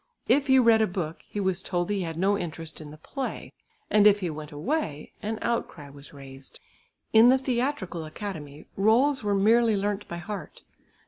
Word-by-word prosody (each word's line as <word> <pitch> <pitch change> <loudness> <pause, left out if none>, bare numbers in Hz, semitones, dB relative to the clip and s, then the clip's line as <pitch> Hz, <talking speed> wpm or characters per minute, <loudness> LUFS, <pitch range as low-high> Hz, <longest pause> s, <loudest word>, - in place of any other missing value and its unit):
If 285 0 +3
he 265 0 +5
read 230 -3 +5
a 220 - +3
book, 170 -3 -4
he 205 - -4
was 190 -2 0
told 175 0 -2
he 200 -2 0
had 165 -2 -4
no 195 +3 +2
interest 165 -4 -6
in 150 - -9
the 150 - -11
play, 265 - -6 0.3
and 210 0 +5
if 205 0 +5
he 175 -3 -2
went 150 0 -8
away, 155 - -3
an 220 +1 -3
outcry 165 -11 -3
was 140 0 -14
raised. 135 -1 -13 0.5
In 225 +2 +8
the 260 - +6
Theatrical 255 - -2
Academy 155 -4 -7
roles 245 +6 +3
were 205 -1 +1
merely 225 +3 +4
learnt 205 +1 -2
by 170 - -6
heart. 200 +4 -7
200 Hz, 185 wpm, -26 LUFS, 160-230 Hz, 0.5 s, In